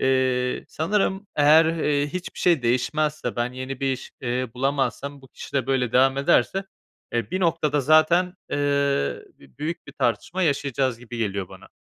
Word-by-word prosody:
Eee, 130 -1 +1
sanırım 195 +3 -1
eğer, 150 +2 +6
eee, 150 -3 +1
hiçbir 180 +4 -6
şey 170 -7 +3
değişmezse, 150 +3 0
ben 120 +1 -1
yeni 130 +1 -6
bir 135 -1 +1
iş, 130 - -7
eee, 125 0 -2
bulamazsam, 140 +1 -2
bu 135 - -15
kişi - - -11
de 135 -3 0
böyle 125 -3 0
devam 135 +1 +4
ederse, 140 +7 +2 0.5
eee, 120 +6 -2
bir 185 +1 -1
noktada 155 -4 +1
zaten, 155 +5 +4 0.2
eee, - - -1 0.8
b 70 - -20
büyük 165 +3 -4
bir - - -10
tartışma 140 - -1
yaşayacağız 135 -5 0
gibi 120 -1 -9
geliyor 100 -4 -2
bana. - - -14
140 Hz, 160 wpm, -24 LUFS, 125-155 Hz, 0.8 s, eğer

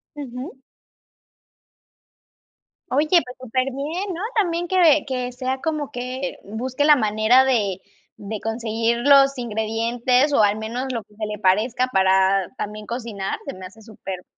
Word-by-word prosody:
Ujú. 265 -2 -7 2.3
Oye, 295 +4 +1
pues 260 -9 +2
superbién, 275 - -3
¿no? 345 - -5
También 350 -5 0
que 335 -5 +4
que 250 -2 -3
sea 260 +1 -3
como 305 -3 -2
que 255 +1 -5
busque 255 +7 -2
la 300 -1 +7
manera 220 +3 +4
de 205 -8 0 0.3
de 210 +1 -6
conseguir 225 +1 -1
los 275 -1 +6
ingredientes 235 +4 0
o 280 - +4
al 205 0 +3
menos 230 +4 -4
lo 230 -3 -4
que 210 - -25
se 215 0 -4
le 210 0 -5
parezca 220 +7 +2
para 190 0 +3
también 210 -1 -6
cocinar, 225 -5 -4
se - - -5
me 185 0 -9
hace 215 +4 -15
súper 195 -4 -8
245 Hz, 140 wpm, -22 LUFS, 215-270 Hz, 2.3 s, la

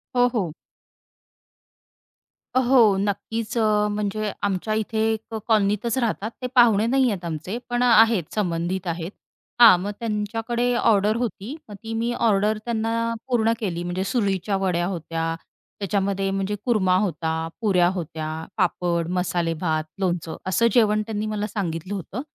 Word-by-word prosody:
हो, 245 0 +5
हो. 185 -10 -1 2.0
अ, 255 - +4
हो. 235 -6 +6
नक्कीच. 210 +3 -2 0.4
म्हणजे 210 0 -2
आमच्या 200 +2 -1
इथे 220 0 -1
एक 220 +1 -7
कॉलनीतच 215 +2 +1
राहतात 225 -3 -1
ते 250 - -2
पाहुणे 225 -4 +5
नाही 260 +1 +3
आहेत 185 -4 -5
आमचे, 165 +6 -4
पण 245 0 +1
आहेत 225 -7 +4
संबंधित 180 -1 -1
आहेत. 170 +1 -3 0.5
हां. 225 -6 +10
मग 200 +2 -3
त्यांच्याकडे 225 +2 -1
ऑर्डर 215 -2 +3
होती 235 - -4
मग 205 - -8
ती 225 0 -5
मी 230 +1 -1
ऑर्डर 210 -1 +2
त्यांना 230 0 -1
पूर्ण 230 -3 +2
केली 175 -6 -3
म्हणजे 175 +2 -2
सुरळीच्या 195 -2 0
वड्या 180 -3 0
होत्या. 165 -2 -3 0.4
त्याच्यामध्ये 195 -1 0
म्हणजे 195 +1 -1
कुरमा 200 -7 +3
होता, 175 -5 -1 0.3
पुऱ्या 185 -5 +3
होत्या, 160 -3 -5 0.3
पापड, 175 -3 0
मसाले 175 -2 0
भात, 160 -3 0 0.2
लोणचं 175 -4 -2
असं 230 +5 +3
जेवण 215 -4 +4
त्यांनी 215 -1 -2
मला 210 -1 -2
सांगितलं 185 -3 -4
होतं. 200 +5 -5
205 Hz, 140 wpm, -23 LUFS, 180-225 Hz, 2.0 s, हां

